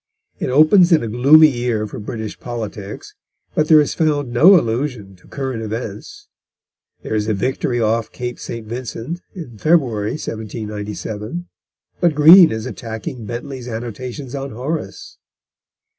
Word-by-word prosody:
It - - -2
opens 155 +7 +5
in 160 -7 +4
a - - -3
gloomy 140 +8 +6
year 120 -4 -2
for 105 - -8
British 110 0 -6
politics, 105 -4 -7 0.4
but 155 - +1
there 155 -1 +7
is 150 - +1
found 145 -6 0
no 175 +9 +7
allusion 115 -5 -3
to 90 - -22
current 130 -4 -4
events. 115 - -7 0.8
There - - -4
is 105 -1 0
a 110 - +1
victory 125 +3 -1
off 115 0 0
Cape 125 -1 -6
St. 115 -2 -7
Vincent 125 +7 -6
in 125 - -9
February, 125 -10 +1
1797, 110 - -6 0.5
but 170 -4 +2
Green 165 +4 +8
is 110 0 -4
attacking 115 0 -7
Bentley's 125 +2 -6
annotations 120 +3 -6
on 140 0 -4
Horace. 165 - -5
120 Hz, 140 wpm, -19 LUFS, 110-150 Hz, 0.8 s, Green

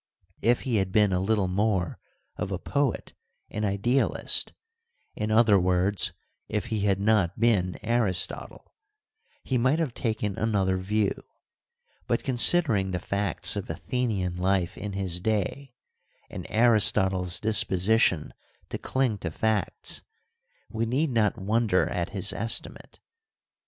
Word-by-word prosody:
If 120 +1 +2
he 125 -5 -1
had 95 -2 -1
been 105 -1 +3
a 90 - +1
little 100 0 0
more 95 -2 -1 0.4
of 95 - -4
a 95 - -2
poet 140 +6 -2 0.4
and 105 - -4
idealist 105 +7 +2 0.3
— 470 - -46
in 105 0 -3
other 110 -2 +4
words, 90 +2 +1 0.4
if 105 +1 -2
he 110 - 0
had 100 -2 +1
not 100 -3 +1
been 100 -6 +1
Aristotle 110 -6 -1 0.3
— - - -67 0.3
he 130 -2 -1
might 130 +6 +2
have 160 -7 -2
taken 110 -5 -3
another 100 -4 0
view; 100 +2 0 0.9
but - - 0
considering 125 - +3
the 90 -1 -2
facts 100 0 +1
of - - -5
Athenian 100 -8 -2
life 90 -1 0
in 105 -1 -6
his 95 -3 -2
day, 110 +6 -2 0.6
and - - -7
Aristotle's 100 -5 +2
disposition 105 -4 +2 0.4
to - - -5
cling 130 -6 -1
to 85 - -4
facts, 110 +6 -2 0.7
we 115 0 -2
need 135 +5 0
not 110 -3 +1
wonder 105 -1 +1
at 85 -1 -3
his 100 -1 -1
estimate. 115 +2 -3
105 Hz, 135 wpm, -26 LUFS, 95-115 Hz, 0.9 s, other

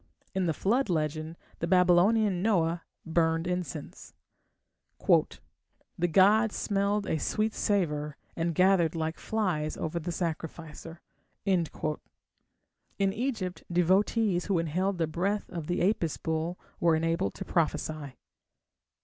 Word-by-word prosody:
In 190 -2 0
the 165 - +1
Flood 240 +5 +1
legend 155 0 -2 0.2
the 170 - -1
Babylonian 180 +2 +4
Noah 175 -5 +1 0.2
burned 165 0 +1
incense. 180 -3 -5 0.9
"The 175 - -1
gods 205 +5 +5
smelled 200 0 0
a 160 - -1
sweet 215 +7 0
savour 150 -7 0 0.2
and 165 0 -1
gathered 180 -2 +4
like 160 0 -2
flies 180 -9 -1
over 160 +2 -2
the 170 +2 -4
sacrificer." 165 -1 -5 0.4
In 180 -5 +2 1.4
Egypt 220 -6 -3
devotees 185 +2 +2
who 195 -3 +1
inhaled 180 +4 0
the 165 - +1
breath 190 +6 -1
of 165 -4 -5
the 175 0 +1
Apis 185 -7 0
bull 160 +2 -2 0.2
were 170 -1 +4
enabled 165 - 0
to - - -6
prophesy. 155 -4 -1
175 Hz, 115 wpm, -29 LUFS, 160-195 Hz, 1.4 s, gods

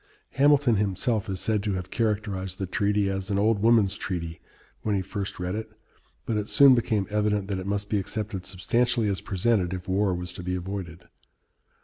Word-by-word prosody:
Hamilton 140 -5 +4
himself 105 +2 0
is 95 -1 -3
said 110 +1 +1
to 105 -1 -1
have 90 -1 -5
characterized 100 -5 -1
the 95 - -2
treaty 100 +1 +1
as 95 0 -3
"an 100 - 0
old 105 +1 +2
woman's 110 -3 +4
treaty," 85 -3 -4 0.4
when 105 -2 0
he 95 - +1
first 100 0 -5
read 90 0 -2
it, 110 +1 -4 0.6
but 110 - -1
it 105 -1 -3
soon 140 -2 +7
became 110 -4 +1
evident 105 -1 +1
that 95 -2 -1
it 95 - -6
must 100 0 -1
be 105 - 0
accepted 100 -1 -4
substantially 115 +5 +1
as 95 - -1
presented, 95 -2 0
if 90 - -8
war 95 0 +1
was 90 0 -5
to 90 - -7
be 90 +1 -2
avoided. 90 -2 -6
100 Hz, 195 wpm, -26 LUFS, 95-110 Hz, 0.6 s, soon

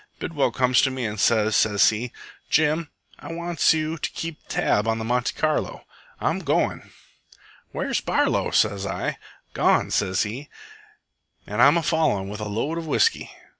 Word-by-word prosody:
Bidwell 150 -4 -1
comes 125 -1 +2
to 135 - +2
me 130 -2 -4
an' 105 -1 -4
sez, 110 0 +3
sez 105 -1 +4
he, 115 +3 -4 0.4
'Jim, 155 +1 +2 0.3
I - - -8
wants 170 -1 +1
you 160 0 -1
to - - -2
keep 165 -2 -6
tab 105 +2 +1
on 115 0 +1
the 110 - -4
Monte 125 +1 0
Carlo. 155 -1 -1 0.3
I'm - - 0
goin'.' - - -1 0.8
"'Where's - - -2
Barlow?' - - +1
sez 100 -2 +1
I. 95 - -3 0.3
'Gone,' - - +2
sez 95 -1 +1
he, 120 +7 -6 1.0
'an' 105 +3 -1
I'm 145 +4 +6
a 170 - 0
followin' 150 - +1
with 105 +1 -6
a 105 - -4
load 140 +11 -2
of 165 - -7
whisky.' 455 - +1
125 Hz, 165 wpm, -24 LUFS, 105-155 Hz, 1.0 s, I'm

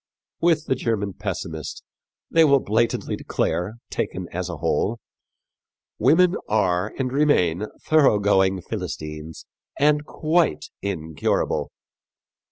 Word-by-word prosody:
With 165 -2 +2
the - - +1
German 110 -6 -1
pessimist, 80 -3 -5 0.5
they 165 - +6
will 140 -3 +5
blatantly 115 +1 0
declare, 90 +5 -2 0.2
taken - - -3
as - - -3
a - - -5
whole, 115 +4 0 1.0
"women 170 - +4
are 95 -2 +1
and 130 -2 -1
remain 105 - +2 0.2
thoroughgoing 100 - +3
Philistines 75 +1 -6 0.3
and 150 +1 +3
quite 155 - 0
incurable." 80 -6 -1
105 Hz, 100 wpm, -23 LUFS, 90-150 Hz, 1.0 s, they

